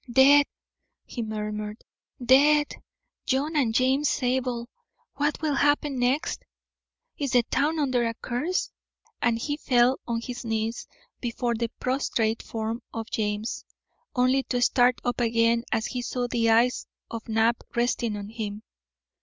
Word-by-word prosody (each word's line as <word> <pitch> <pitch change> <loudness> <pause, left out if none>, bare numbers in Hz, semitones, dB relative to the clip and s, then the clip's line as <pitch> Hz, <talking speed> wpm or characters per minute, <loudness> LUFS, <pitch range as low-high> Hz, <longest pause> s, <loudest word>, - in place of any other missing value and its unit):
"Dead!" 275 +3 +7 0.6
he 240 - -5
murmured. 210 -1 -4 0.4
"Dead! 295 +4 +5 0.5
John 280 +4 0
and 265 -7 +2
James 260 +5 +2
Zabel. 250 -2 -1 0.5
What 290 +1 0
will 305 -2 +1
happen 290 -1 +2
next? 265 +7 0 0.8
Is 280 -3 -2
the 245 -1 +5
town 300 +7 0
under 255 -5 +1
a 230 - -3
curse?" 275 +12 -2 0.5
And 235 -1 +2
he 290 +5 -3
fell 250 -2 +3
on 235 -1 -1
his 245 +1 -6
knees 225 0 -2 0.3
before 240 0 -2
the 235 0 -2
prostrate 235 -4 0
form 225 +1 -4
of 225 -1 -6
James, 210 0 -2 0.5
only 255 +2 +3
to 245 - -1
start 245 0 +3
up 245 0 -1
again 230 0 +2
as 220 - 0
he 250 - -3
saw 245 0 -2
the 230 -1 +1
eyes 235 +3 +3 0.2
of 230 0 -7
Knapp 225 +1 +2
resting 235 -2 0
on 200 0 -7
him. 215 -2 -5
245 Hz, 140 wpm, -26 LUFS, 230-265 Hz, 0.8 s, Dead